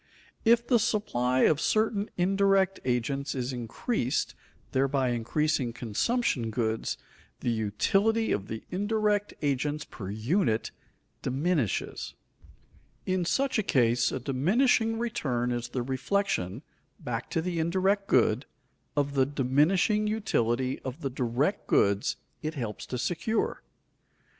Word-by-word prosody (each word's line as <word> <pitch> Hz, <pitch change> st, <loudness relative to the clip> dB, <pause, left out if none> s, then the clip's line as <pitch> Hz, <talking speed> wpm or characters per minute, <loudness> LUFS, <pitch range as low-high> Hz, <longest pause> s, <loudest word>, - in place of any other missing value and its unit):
If 235 Hz, +1 st, +4 dB
the 240 Hz, -1 st, +4 dB
supply 130 Hz, -, +1 dB
of 155 Hz, -1 st, +4 dB
certain 215 Hz, -1 st, +1 dB
indirect 195 Hz, +1 st, +3 dB
agents 135 Hz, +3 st, -1 dB
is 130 Hz, 0 st, -2 dB
increased, 125 Hz, -, -1 dB, 0.4 s
thereby 135 Hz, -1 st, +1 dB
increasing 120 Hz, +2 st, 0 dB
consumption 120 Hz, -, 0 dB
goods, 110 Hz, 0 st, -1 dB, 0.4 s
the 120 Hz, -, 0 dB
utility 195 Hz, -, +1 dB
of 100 Hz, -1 st, -1 dB
the 110 Hz, -, -6 dB
indirect 205 Hz, +1 st, 0 dB
agents 145 Hz, +2 st, 0 dB
per 95 Hz, -4 st, -8 dB
unit 115 Hz, -, 0 dB, 0.5 s
diminishes. 140 Hz, -, -1 dB, 0.9 s
In 185 Hz, -1 st, 0 dB
such 270 Hz, +5 st, +1 dB
a -, -, +4 dB
case 120 Hz, -, +2 dB
a -, -, -2 dB
diminishing 225 Hz, -, +2 dB
return 130 Hz, -, -1 dB
is 120 Hz, 0 st, -2 dB
the 125 Hz, 0 st, -2 dB
reflection, 130 Hz, -, -1 dB, 0.4 s
back 115 Hz, -1 st, -4 dB
to -, -, 0 dB
the 170 Hz, 0 st, -2 dB
indirect 190 Hz, +4 st, +1 dB
good, 120 Hz, +1 st, +3 dB, 0.5 s
of 140 Hz, -1 st, +1 dB
the 135 Hz, -2 st, +3 dB
diminishing 150 Hz, -, +2 dB
utility 130 Hz, -, 0 dB
of 130 Hz, +5 st, -7 dB
the 135 Hz, -, -2 dB
direct 130 Hz, -, -1 dB
goods 100 Hz, 0 st, +2 dB, 0.3 s
it 155 Hz, +1 st, -3 dB
helps 115 Hz, -6 st, -5 dB
to 125 Hz, -, -3 dB
secure. 165 Hz, -, -1 dB
140 Hz, 120 wpm, -28 LUFS, 120-195 Hz, 0.9 s, If